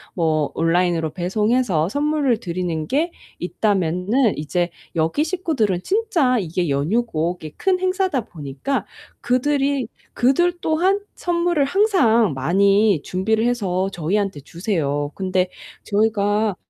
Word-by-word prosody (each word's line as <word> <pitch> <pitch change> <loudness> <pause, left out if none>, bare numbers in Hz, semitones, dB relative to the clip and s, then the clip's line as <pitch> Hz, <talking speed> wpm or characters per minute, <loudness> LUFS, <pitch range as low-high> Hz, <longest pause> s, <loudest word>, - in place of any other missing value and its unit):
뭐 155 -4 +1
온라인으로 165 -1 +1
배송해서 195 -1 +1
선물을 290 -3 +1
드리는 170 -5 -3
게 320 +5 0 0.3
있다면은 195 +5 +1
이제 175 +4 -1 0.3
여기 165 - +1
식구들은 305 - -1
진짜 350 - +1
이게 175 -3 -2
연휴고 170 +3 0
이게 155 -1 -9
큰 375 -1 +1
행사다 370 -6 0
보니까 145 - -4 0.4
그들이 275 +1 +1 0.3
그들 345 +8 +2
또한 360 +6 +2
선물을 345 -3 0
항상 270 - +3
많이 195 +5 +3
준비를 220 +5 0
해서 195 -6 0
저희한테 190 +1 -1
주세요. 145 -3 -2
근데 185 -1 0 0.3
저희가 210 -1 +1
205 Hz, 275 characters per minute, -21 LUFS, 175-275 Hz, 0.4 s, 항상